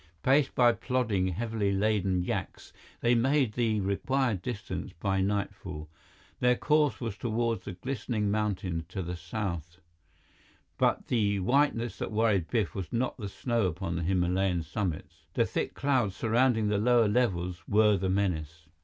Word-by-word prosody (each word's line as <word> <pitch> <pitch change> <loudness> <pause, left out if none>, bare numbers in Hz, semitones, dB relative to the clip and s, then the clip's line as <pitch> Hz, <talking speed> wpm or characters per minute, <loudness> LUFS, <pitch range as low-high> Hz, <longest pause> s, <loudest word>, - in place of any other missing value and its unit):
Paced 135 +1 +3
by 120 -1 +6
plodding, 115 -4 0
heavily 105 +2 -1
laden 100 -2 +1
yaks, - - -4 0.3
they 120 - +3
made 130 0 +2
the 110 -3 +1
required 110 +2 0
distance 115 -2 -5
by 95 0 0
nightfall. 95 -6 -3 0.5
Their 125 0 +4
course 150 -4 +2
was 115 -5 -4
toward 115 +1 -1
the 100 - -7
glistening 110 0 -2
mountains 95 -6 -1
to 95 +1 -4
the 90 +1 -4
south, 85 -2 -5 1.0
but - - +2
the 100 -4 +1
whiteness 120 -2 +1
that - - -3
worried 105 -6 +2
Biff 110 -7 0
was 95 -4 -5
not 125 +2 -1
the 105 -4 -5
snow 115 0 0
upon 90 0 -3
the 85 - -2
Himalayan 90 0 +1
summits. 80 -3 -4
The - - +3
thick - - -3
clouds 130 -8 +1
surrounding 115 0 +2
the 105 -1 +1
lower 120 0 +4
levels 90 -6 0
were 105 0 +4
the 95 0 -1
menace. 80 -5 -1
105 Hz, 150 wpm, -29 LUFS, 90-120 Hz, 1.0 s, by